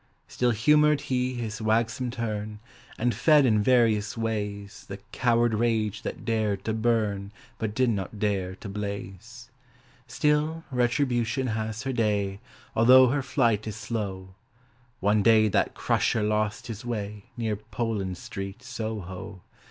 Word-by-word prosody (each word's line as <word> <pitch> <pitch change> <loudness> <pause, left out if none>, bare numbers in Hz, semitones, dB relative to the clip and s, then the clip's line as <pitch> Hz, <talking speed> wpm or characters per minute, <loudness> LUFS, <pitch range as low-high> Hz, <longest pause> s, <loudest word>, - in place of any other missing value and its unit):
Still 125 - 0
humoured 150 +5 +4
he 130 -2 -1
his 110 -3 -4
wagsome 115 +3 +1
turn, 110 -3 -4 0.4
And 120 +1 +1
fed 145 +5 +5
in 110 -4 +3
various 110 -3 +2
ways 105 -3 -4
The 100 - -6
coward 120 -1 +2
rage 110 -2 0
that - - -6
dared 105 -4 0
to 110 - 0
burn 110 -3 0 0.3
But 110 -1 -3
did 130 -1 +3
not 100 0 -4
dare 95 -3 -1
to 105 - -9
blaze. 105 +4 -7 0.6
Still, 150 +5 0
Retribution 125 0 +1
has 110 +2 -3
her 135 0 -2
day 100 -4 0 0.4
Although 130 +3 +7
her 140 +2 +1
flight 120 -6 +1
is 105 - -4
slow: 100 -5 -4 0.7
One 105 +2 +3
day 110 0 +5
that - - +1
Crusher 110 - +1
lost 105 +1 0
his 115 -1 -7
way 105 -4 -5
Near 110 -3 -1
Poland 105 -3 -3
Street, 95 +6 -7
Soho. 105 -6 -6
110 Hz, 135 wpm, -27 LUFS, 105-120 Hz, 0.7 s, Although